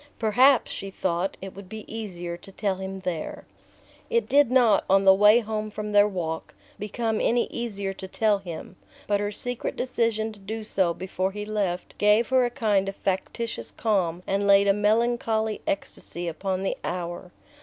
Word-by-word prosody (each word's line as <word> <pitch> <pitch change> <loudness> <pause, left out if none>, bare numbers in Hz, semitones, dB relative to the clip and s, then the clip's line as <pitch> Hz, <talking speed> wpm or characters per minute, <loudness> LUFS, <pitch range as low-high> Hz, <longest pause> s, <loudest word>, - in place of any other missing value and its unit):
"Perhaps," 245 +4 +4
she 195 - -5
thought, 185 -1 -2
"it 195 - -7
will 200 - -9
be 215 +3 -9
easier 180 -6 -5
to 185 +3 -13
tell 195 -1 -1
him 190 0 -6
there." 175 -4 -4 0.6
It 470 0 +1
did 285 -2 +4
not, 240 -5 +4
on 195 +1 +4
the 190 - +9
way 210 +4 +6
home 215 -1 -3
from 210 0 -5
their 205 0 +6
walk, 165 -5 -4 0.2
become 220 +2 -2
any 240 0 +3
easier 200 -5 -3
to 190 0 -8
tell 210 +1 +1
him; 175 -1 -8 0.3
but 205 -1 +1
her 205 0 -1
secret 245 +3 -4
decision 230 -3 -1
to 205 - -16
do 215 +3 -5
so 185 -5 +1
before 185 0 -2
he 210 0 -5
left 200 -4 -2
gave 210 +2 +4
her 260 -1 +4
a - - 0
kind 210 -6 +1
of 195 - -7
factitious 200 +5 -3
calm 180 -6 0
and 200 +1 0
laid 200 0 +6
a 200 - +5
melancholy 220 +1 +1
ecstasy 175 -3 -3
upon 185 +3 -2
the 195 - -1
hour. 175 0 -4
205 Hz, 175 wpm, -26 LUFS, 190-220 Hz, 0.6 s, the